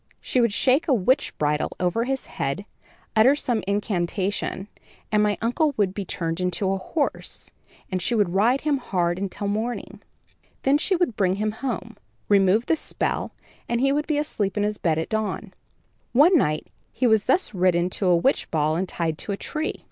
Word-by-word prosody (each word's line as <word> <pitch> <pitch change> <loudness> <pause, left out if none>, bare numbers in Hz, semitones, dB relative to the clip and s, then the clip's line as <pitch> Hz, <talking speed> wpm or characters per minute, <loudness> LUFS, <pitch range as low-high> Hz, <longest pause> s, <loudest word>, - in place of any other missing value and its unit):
She 255 - 0
would 235 -2 +3
shake 260 +8 +2
a 275 - +4
witch 250 +6 +1
bridle 150 0 0
over 180 +6 +1
his 270 +1 -2
head, 140 +9 -3 0.5
utter 235 +6 +6
some 245 -6 -1
incantation 195 -1 -1 0.4
and 210 -1 +3
my 210 -1 +2
uncle 280 +5 +1
would 195 -3 +1
be 200 0 -4
turned 165 0 -2
into 180 +2 0
a 195 - -1
horse, 285 - -3 0.4
and 185 -1 -1
she 240 - +1
would 200 -5 +1
ride 235 +8 +3
him 290 -2 +1
hard 180 -7 -1
until 200 +1 -3
morning. 220 +4 -3 0.6
Then 280 +2 +4
she 375 +4 +1
would 340 - 0
bring 190 -2 +2
him 215 +1 -1
home, 255 +4 -5 0.3
remove 200 +3 +4
the 325 - +2
spell, - - -2 0.4
and 235 - +1
he 275 +2 +3
would 295 +2 0
be 305 -2 +1
asleep 215 -9 -2
in 205 0 +2
bed 160 -3 +1
at 160 - -2
dawn. 215 -2 -3 0.6
One 305 +9 +6
night 155 - +2 0.3
he 255 - -1
was 220 -3 +4
thus 360 -9 +2
ridden 180 -1 +2
to 190 - -1
a 180 - +5
witch 265 +11 +1
ball 155 -1 +1
and 180 +2 -2
tied 165 -2 -2
to 205 - -3
a - - -4
tree. 310 +7 -3
205 Hz, 185 wpm, -24 LUFS, 185-255 Hz, 0.6 s, utter